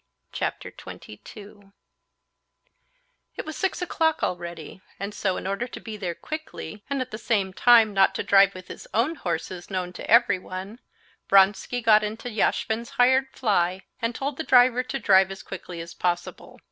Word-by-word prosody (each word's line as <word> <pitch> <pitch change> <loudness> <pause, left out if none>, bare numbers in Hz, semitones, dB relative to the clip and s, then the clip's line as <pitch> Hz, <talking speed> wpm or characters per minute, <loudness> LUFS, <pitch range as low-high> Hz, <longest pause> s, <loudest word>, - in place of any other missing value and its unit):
Chapter - - -4
22 205 -2 -12 1.6
It - - -6
was 315 -1 -6
six 380 -1 -1
o'clock 320 -3 0
already, 170 0 -5 0.2
and 200 +1 -5
so, 190 -3 -1
in - - -6
order 200 +6 -2
to - - -9
be 220 -2 -8
there 180 -5 -4
quickly, 260 - -7
and 280 -2 -1
at 255 - -5
the 215 - -6
same 200 -5 0
time 225 -1 +5
not 195 -1 +3
to - - -2
drive 195 -1 +5
with 185 -1 -10
his - - -10
own 245 +9 +2
horses, 180 - -5
known 180 -2 -3
to - - -9
everyone, 200 -2 +1 0.5
Vronsky 200 +5 +3
got 215 -2 +5
into 220 +3 -5
Yashvin's 220 +2 -1
hired 260 +2 +4
fly, 190 -5 0 0.2
and 230 0 -1
told 275 0 -3
the 320 - -3
driver 250 -2 +5
to 255 +2 -4
drive 190 -6 +4
as 195 0 -8
quickly 180 -2 -8
as 165 0 -9
possible. 175 -1 -3
210 Hz, 165 wpm, -25 LUFS, 190-245 Hz, 1.6 s, time